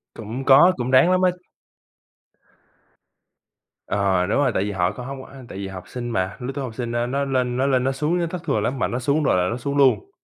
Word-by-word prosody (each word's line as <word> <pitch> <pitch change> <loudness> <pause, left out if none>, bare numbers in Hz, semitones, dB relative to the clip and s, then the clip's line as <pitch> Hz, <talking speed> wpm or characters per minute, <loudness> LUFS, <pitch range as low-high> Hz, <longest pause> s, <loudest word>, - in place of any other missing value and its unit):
Cũng 115 +4 -6
có, 145 +7 +7
cũng 125 0 -2
ráng 130 +7 +5
lắm 185 0 +2
á. 185 -1 +4 2.6
Ờ, 95 -3 +1
đúng - - 0
rồi, 140 -3 +2
tại 95 - 0
vì 105 - -3
họ 90 -2 0
có 115 +4 -8
hông 135 +1 -7
á, 135 -1 -13
tại - - -8
vì 100 0 -5
học 95 -1 -8
sinh 120 -1 -6
mà, 95 -3 -2
lứa 125 +1 -4
tuổi 140 - -3
học 120 -4 -6
sinh, 120 -1 -4
a, 120 0 0
nó 140 +3 -1
lên 125 -2 -1
nó 130 - +1
lên 130 -2 +2
nó 135 - +1
xuống 150 +6 -1
á 170 - 0
thất 175 -1 -6
thường 105 - 0
lắm, 130 +4 -2
mà - - +1
nó 125 - -3
xuống 140 +5 +1
rồi 135 - +2
là 90 0 +1
nó 115 - -3
xuống 140 +3 -3
luôn. 140 - +3
125 Hz, 250 wpm, -22 LUFS, 110-140 Hz, 2.6 s, có